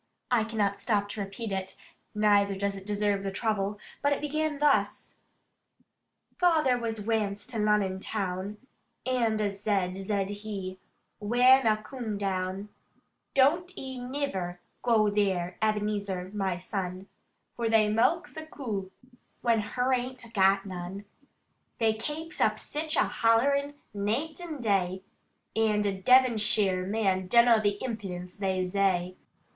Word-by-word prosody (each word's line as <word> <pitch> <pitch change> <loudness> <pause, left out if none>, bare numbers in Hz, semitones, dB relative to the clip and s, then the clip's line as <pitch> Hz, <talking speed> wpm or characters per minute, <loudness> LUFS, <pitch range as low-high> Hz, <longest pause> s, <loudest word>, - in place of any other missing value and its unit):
I 230 -3 +3
cannot 205 -3 -1
stop 205 -3 +1
to 210 - -6
repeat 200 +2 -5
it, 190 -1 -4 0.4
neither 205 -1 +3
does 200 +1 -1
it 195 0 -10
deserve 205 -1 +1
the 195 - -2
trouble; 205 0 -1 0.2
but 285 - +2
it 285 - +1
began 305 0 -1
thus: 290 -1 +1 1.2
"Fayther 315 -8 +4
was 225 -2 -3
wance 210 -2 -1
to 230 - -2
Lonnon 210 -3 +2
town, 195 0 -3 0.5
And 235 -4 +1
a 205 -1 +1
zed, 195 -2 -1
zed 195 0 -2
he, 190 -3 -5 0.4
whan 245 +4 +5
a 215 -1 +4
coom 230 -4 -5
down, 195 0 -2 0.7
'Don't 340 +8 +3
e 265 -1 -6
niver 245 -9 -3 0.2
goo 220 -4 +3
there, 190 -4 0
Ebenezer 205 -3 -1
my 190 -3 -1
son, 185 0 -4 0.5
For 230 -1 -1
they 220 -1 +4
mulks 240 +14 +1
a 315 0 -6
coo, 215 -11 -4 0.5
when 230 -2 +3
her 250 +5 0
ain't 250 -2 -3
gat 195 0 +4
none. 185 +1 -6 0.7
They 225 -2 +3
kapes 300 +9 -5
up - - +3
sich 310 +1 -4
a - - +4
hollerin, 280 +5 +2 0.2
naight 225 - -2
and 315 -7 -6
day, 190 -3 +1 0.5
And 215 -2 +2
a 200 - +1
Devonsheer 210 -4 +3
man 195 -3 0
dunno 235 +2 +6
the 205 -1 +1
impudence 190 -7 -5
they 190 -2 0
zay. 185 -1 +1
210 Hz, 135 wpm, -28 LUFS, 195-245 Hz, 1.2 s, dunno